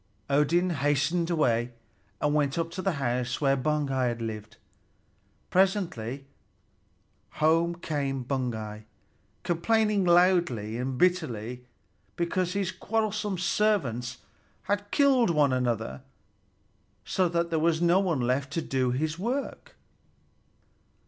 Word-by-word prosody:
Odin 165 +6 +3
hastened 150 +4 +1
away, 120 -7 +1 0.5
and 150 0 +1
went 145 -1 +1
up 165 0 -1
to 185 - -5
the 195 -1 0
house 125 -3 -1
where 135 -2 +3
Baugi 135 -4 0
lived. 110 -2 -6 0.9
Presently 170 - 0 1.1
home 165 +2 +2
came 140 -6 -3
Baugi, 110 -5 -3 0.6
complaining 210 +4 +1
loudly 175 - +3
and 130 0 -3
bitterly 125 -9 0 0.5
because 175 +1 -1
his 195 -2 -1
quarrelsome 215 -2 -2
servants 140 - 0 0.5
had 205 0 -2
killed 265 -5 +4
one 150 -5 +3
another, 115 - -1 1.0
so 185 -2 +1
that 170 0 -1
there 160 - +1
was 160 0 +2
not 175 +3 +3
one 165 -8 0
left 130 +3 0
to 165 - 0
do 130 -2 0
his 155 +6 -2
work. 250 +8 -4
155 Hz, 110 wpm, -27 LUFS, 125-180 Hz, 1.1 s, killed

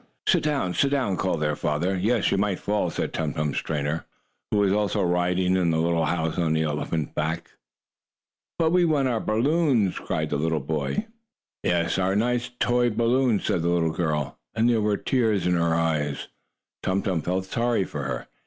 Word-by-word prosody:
"Sit - - +4
down! 140 -12 0
Sit 140 - +2
down!" 135 -9 0
called 90 -4 -1
their 75 -1 +1
father. 80 +7 -1
"Yes, 105 +4 +1
you - - +2
might 100 -2 +1
fall," 105 +1 -1
said - - -3
Tum 80 -2 -2
Tum's 75 -2 -1
trainer, 75 -2 -2
or - - 0
keeper, - - -12 0.4
who 105 - +1
was 100 -1 +3
also 105 -1 +1
riding 90 +1 +1
in 90 -2 +2
the 80 - +1
little 85 0 +1
house 80 0 -1
on 80 -2 +1
the 80 0 +1
elephant's 75 0 -2
back. 80 +2 -3 1.1
"But 160 -1 +2
we 180 0 +4
want 145 -5 +2
our 115 -3 0
balloons!" 120 - +1
cried 75 -1 -2
the 75 - +1
little 80 0 0
boy. 80 - -2 0.6
"Yes, 85 +1 +1
our 95 +1 +1
nice 120 +3 0
toy 120 0 +2
balloons!" 120 0 +1
said 85 - +1
the 85 - 0
little 85 -2 +2
girl, 75 -4 -2 0.2
and 115 +1 +3
there 115 -2 +3
were 105 -1 +1
tears 110 -7 +1
in 90 - +2
her 85 -1 +2
eyes. 75 -3 -1 0.5
Tum 95 +1 0
Tum 90 -5 0
felt 90 +3 -1
sorry 115 +1 0
for - - -5
her. - - -4
95 Hz, 195 wpm, -25 LUFS, 80-115 Hz, 1.1 s, Sit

